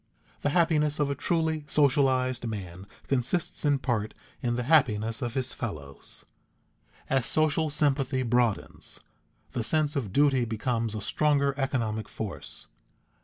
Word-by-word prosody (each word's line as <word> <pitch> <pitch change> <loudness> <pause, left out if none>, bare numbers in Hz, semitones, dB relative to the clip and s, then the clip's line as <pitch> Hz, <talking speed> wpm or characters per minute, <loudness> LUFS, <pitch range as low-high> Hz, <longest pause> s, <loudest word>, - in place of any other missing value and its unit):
The - - 0
happiness 150 -2 +2
of 145 -1 +1
a - - +1
truly 160 +1 0
socialized 130 -4 +2
man 95 -3 -6 0.2
consists 140 +6 0
in 145 -1 +4
part 120 -5 -2 0.3
in 120 -1 0
the 125 - -1
happiness 115 -5 +3
of 120 -3 -3
his 130 -1 -1
fellows. 75 - -6 0.8
As 135 -2 +2
social 155 0 +2
sympathy 140 -3 +1
broadens, 110 - 0 0.5
the 120 - -2
sense 150 +3 +1
of 120 -9 -2
duty 140 0 +4
becomes 115 0 -1
a 105 - -3
stronger 140 +4 +2
economic 115 -6 -1
force. 100 -8 -5
130 Hz, 130 wpm, -28 LUFS, 110-145 Hz, 0.8 s, in